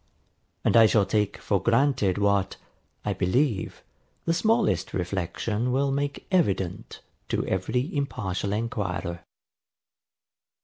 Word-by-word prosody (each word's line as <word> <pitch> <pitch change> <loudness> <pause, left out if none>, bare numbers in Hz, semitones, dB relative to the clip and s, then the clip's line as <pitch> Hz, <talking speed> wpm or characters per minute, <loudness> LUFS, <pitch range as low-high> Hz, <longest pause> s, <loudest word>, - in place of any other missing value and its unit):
And - - +3
I 115 -1 +8
shall 105 -2 +3
take 105 0 0
for 100 -3 0
granted 115 -4 +2
what, 100 -1 +1 0.5
I - - 0
believe, 110 - 0 0.4
the 165 - +2
smallest 220 +5 +1
reflection 95 +6 -2
will 135 +2 +1
make 140 +1 -2
evident 100 - 0 0.3
to - - 0
every 125 - -1
impartial 100 -9 -2
enquirer. 100 -6 -2
110 Hz, 105 wpm, -26 LUFS, 95-135 Hz, 0.5 s, I